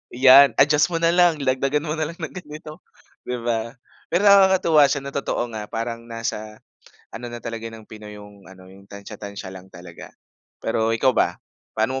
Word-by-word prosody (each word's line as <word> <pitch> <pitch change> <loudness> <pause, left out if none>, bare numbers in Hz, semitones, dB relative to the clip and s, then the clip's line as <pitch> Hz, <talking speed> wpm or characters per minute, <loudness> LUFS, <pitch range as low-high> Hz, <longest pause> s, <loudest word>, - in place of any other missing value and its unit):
‘yan 135 +2 +7
adjust 150 +3 +4
mo 170 -1 -3
na 165 - +4
lang, 175 -2 +4
dagdagan 135 +3 0
mo 155 0 -4
na 155 - -1
lang 165 - -9
ng 160 -5 -7
ganito 155 -2 -10 0.5
'di 125 - -2
ba? 115 +1 -2 0.3
Pero 180 +4 +1
nakakatuwa 190 -7 +5
siya, 140 -2 -2
na 140 - -7
totoo 120 -4 -3
nga, 105 -1 -6
parang 115 +1 -5
nasa 110 -2 -5 0.6
ano 120 +2 -7
na 120 0 -7
talaga 115 -1 -5
ng 110 -1 -12
pinoy 105 -1 -11
yung 100 -2 -15
ano, 95 -1 -15
yung 100 +1 -18
tantya-tantya 100 -1 -9
lang 95 0 -12
talaga. 90 -2 -12 0.5
Pero 110 0 0
ikaw 130 +3 +2
ba, - - 0 0.4
paano 130 +5 0
120 Hz, 180 wpm, -22 LUFS, 110-150 Hz, 0.6 s, yan